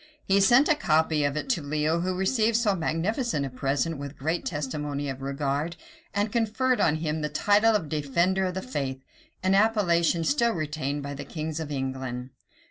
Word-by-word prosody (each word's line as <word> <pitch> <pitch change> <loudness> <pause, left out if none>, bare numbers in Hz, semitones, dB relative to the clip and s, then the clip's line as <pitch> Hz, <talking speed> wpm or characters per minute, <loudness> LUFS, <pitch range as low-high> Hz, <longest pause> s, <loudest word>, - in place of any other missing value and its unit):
He 195 +1 +3
sent 240 +8 +6
a 325 - +5
copy 160 - +2
of 145 +1 0
it - - -3
to 240 -11 +1
Leo, 155 +3 0
who 185 +1 -1
received 220 +3 +2
so 220 -4 +2
magnificent 175 - -1
a 135 - -5
present 140 +4 -1
with 140 +1 -7
great 160 +5 -2
testimony 145 -1 -3
of 135 0 -6
regard; 140 +4 -2 0.4
and 205 +1 -1
conferred 235 +3 +1
on 155 - +3
him 155 0 -2
the 150 - -1
title 210 +8 +3
of 170 -7 0
"defender 170 +6 +1
of 180 -1 -3
the 190 - -3
faith;" 135 - -4 0.4
an 190 +1 +3
appellation 180 -6 +3
still 235 - +2
retained 150 -3 -3
by 140 0 -5
the 140 - -6
kings 155 0 -5
of 160 -2 -5
England. 130 -2 -4
160 Hz, 185 wpm, -27 LUFS, 145-200 Hz, 0.4 s, sent